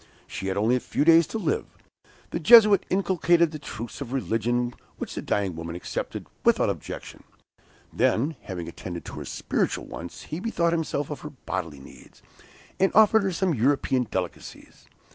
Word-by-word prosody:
She 95 - -6
had 95 - -1
only 110 +5 +3
a - - +1
few 145 - -1
days 165 -1 +6
to - - -4
live. 420 - -1 0.6
The - - -2
Jesuit 215 -4 +7
inculcated 175 -3 +2
the 155 - -7
truths 120 -2 -7
of 130 -2 -5
religion, 120 -1 0 0.2
which - - -5
the - - -4
dying 100 -4 -1
woman 85 +1 -6
accepted, 90 - -5 0.2
without - - +3
objection. - - -8 0.7
Then 145 +8 +1
having 90 -3 -6
attended 85 0 -7
to - - -8
her - - -7
spiritual - - -2
wants, 85 +1 -8
he 155 - -5
bethought 175 -5 0
himself 155 -3 -2
of 150 - -5
her 150 - -7
bodily 90 - -5
needs, 65 - -16 0.6
and 195 - +3
offered 220 +1 +6
her 195 -1 0
some 180 0 0
European 130 -1 +1
delicacies. 90 -2 -6
140 Hz, 165 wpm, -26 LUFS, 100-170 Hz, 0.7 s, Jesuit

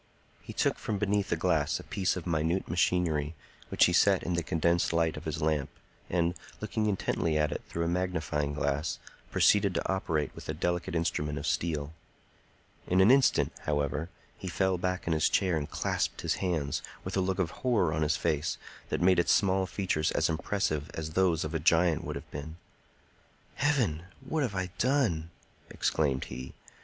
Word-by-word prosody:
He - - -9
took - - 0
from 105 - -2
beneath 100 -1 0
a - - +3
glass 80 -3 +1
a - - -9
piece 95 -1 -1
of 90 - -5
minute 85 +2 0
machinery, 85 -3 +1 0.3
which - - +5
he 90 - +1
set 95 +2 +4
in 90 - -1
the 85 - +1
condensed 85 +2 +1
light 85 -1 +2
of - - -8
his - - -3
lamp, 75 -3 +1 0.4
and, 85 -1 +1 0.3
looking 110 0 -1
intently 85 -5 0
at 75 -1 +1
it - - -3
through 85 - -2
a - - 0
magnifying 80 -5 -1
glass, 75 +2 -1 0.3
proceeded 100 -2 +4
to - - -1
operate 80 -6 -1
with - - -10
a 75 - -1
delicate 85 +1 -1
instrument 75 -3 -1
of 70 - -4
steel. 75 -3 -1 0.9
In 90 - +3
an 95 +5 +7
instant, 135 0 +4
however, 75 +2 -1 0.3
he 95 - -6
fell 95 0 +1
back 90 0 -2
in 85 - +1
his 80 - +3
chair 95 -4 +2
and 75 -2 -2
clasped - - -1
his - - 0
hands, 80 -7 -1 0.2
with - - -4
a 95 - +2
look 95 0 0
of 90 -4 0
horror 110 -11 +2
on 75 - -1
his 75 -1 +2
face 80 -1 0 0.3
that - - -1
made 90 0 +5
its 85 - +3
small 95 -4 +3
features 90 -6 0
as - - +2
impressive 80 -3 -1
as 80 -1 -4
those 85 -2 +2
of 80 +1 -4
a 80 - 0
giant 80 +1 +3
would - - -4
have - - -8
been. 75 +3 -6 1.0
"Heaven! 120 - +1 0.2
What 145 +4 -2
have 120 -8 -1
I 95 -1 -2
done?" 115 - +1 0.4
exclaimed 70 -4 0
he. 65 +1 -8
85 Hz, 185 wpm, -30 LUFS, 75-95 Hz, 1.0 s, an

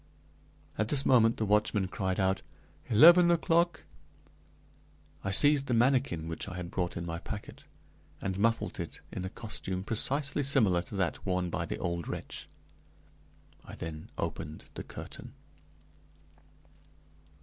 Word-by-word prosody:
At 110 - +1
this 140 +3 +2
moment 115 -3 +5
the 110 - 0
watchman 105 -1 +2
cried 95 +1 -2
out, 95 0 +1 0.5
"Eleven 170 +10 +8
o'clock!" 170 0 +2 1.4
I 95 - -2
seized 140 +7 +5
the 125 - +1
manikin 120 - +2
which 80 +3 -5
I 90 - -7
had 90 -1 -6
brought 90 -3 -2
in 85 - -4
my 85 0 -4
packet, 105 +3 -8 0.5
and 95 0 -3
muffled 115 +2 0
it - - -6
in 90 - -5
a - - -3
costume 95 -3 -5
precisely 140 +7 -1
similar 115 -11 +3
to 90 - -10
that 95 -3 -1
worn 90 -2 -1
by - - -2
the - - -3
old 85 -1 -3
wretch. - - -6 1.2
I - - -10
then 80 -1 -7
opened 75 +2 -5
the - - -6
curtain. - - -9
100 Hz, 140 wpm, -30 LUFS, 90-135 Hz, 1.4 s, Eleven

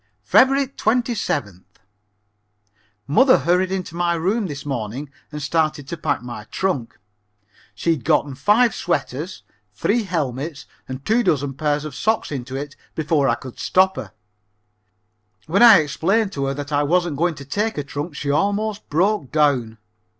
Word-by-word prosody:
Feb. 270 - +4
27th. 185 - -1 1.4
Mother 255 - +5
hurried 180 +2 +1
into 185 -3 -4
my 170 0 +1
room 195 +6 0
this 145 -3 -7
morning 135 +1 -4 0.2
and 150 - -5
started 155 -1 0
to 170 - -4
pack 150 -5 -2
my 120 -4 -7
trunk. 140 -7 -2 0.8
She 165 - 0
had 155 -7 -1
gotten 145 -1 +2
five 210 - +3
sweaters, - - -3 0.3
three 235 -3 +1
helmets 150 -4 -3 0.2
and 130 +1 -7
two 225 +3 +3
dozen 145 - 0
pairs 150 +1 -1
of 155 - -6
socks 215 - 0
into 130 -2 -5
it 145 +1 -5 0.2
before 150 -3 +1
I 115 - +3
could 130 0 -11
stop 190 +1 +3
her. - - -7 1.3
When 185 +7 +1
I 230 -4 +10
explained 190 - 0
to 140 -6 -2
her 135 0 -2
that 145 +1 -6
I 145 0 +2
wasn't 170 0 +1
going 170 +1 +1
to 140 - -10
take 210 +9 -1
a 145 - -1
trunk 145 +2 -6
she 140 0 -2
almost 205 +6 -1
broke 175 - +1
down. 135 -7 +1
155 Hz, 155 wpm, -21 LUFS, 140-190 Hz, 1.4 s, I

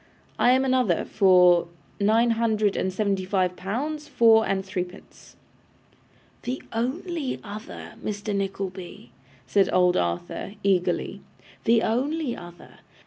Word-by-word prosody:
'I 245 - +5
am 260 +1 +2
another 255 -9 +1
for 180 -3 +5 0.3
nine 225 +3 +3
hundred 220 -3 +1
and 190 - -1
seventy 195 -1 -1
five 185 -1 0
pounds 290 +12 -4
four 225 -5 +4
and 190 -1 -1
threepence.' 185 -1 -7 1.1
'The 255 +3 -4
only 280 +5 -2
other, 210 +1 -9
Mr. 205 0 -3
Nickleby,' 190 -8 -5 0.3
said 195 +10 +2
old 180 -1 +3
Arthur, 85 - -3
eagerly. 180 -2 0 0.4
'The 230 -1 +4
only 270 +3 -1
other. 175 -1 -13
205 Hz, 115 wpm, -25 LUFS, 185-235 Hz, 1.1 s, I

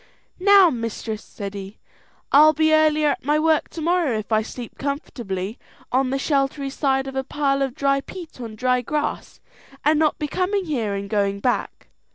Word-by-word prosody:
"Now, 390 -2 +6
mistress," 230 -2 -4
said 200 -2 -7
he, 200 +1 -8 0.5
"I'll 305 +2 +7
be 315 +1 +2
earlier 310 -1 +4
at 280 - -2
my 295 +3 +2
work 315 0 +2
to 330 - -7
morrow 335 -7 +1
if 215 +1 -6
I 215 0 +3
sleep 235 +1 -9
comfortably 230 -8 -4 0.3
on 260 +1 +2
the 270 - 0
sheltery 275 0 0
side 270 -1 0
of 270 0 -7
a 265 - -1
pile 275 0 0
of 270 -2 -1
dry 275 0 +1
peat 330 -4 -10
on 225 -2 -7
dry 250 +2 +1
grass, 295 +5 -3 0.5
and 305 0 +4
not 310 -2 +2
be 300 - -3
coming 375 +5 -1
here 230 -10 -2
and 200 0 -4
going 200 -1 0
back. 245 +4 -2
275 Hz, 185 wpm, -22 LUFS, 230-305 Hz, 0.5 s, I'll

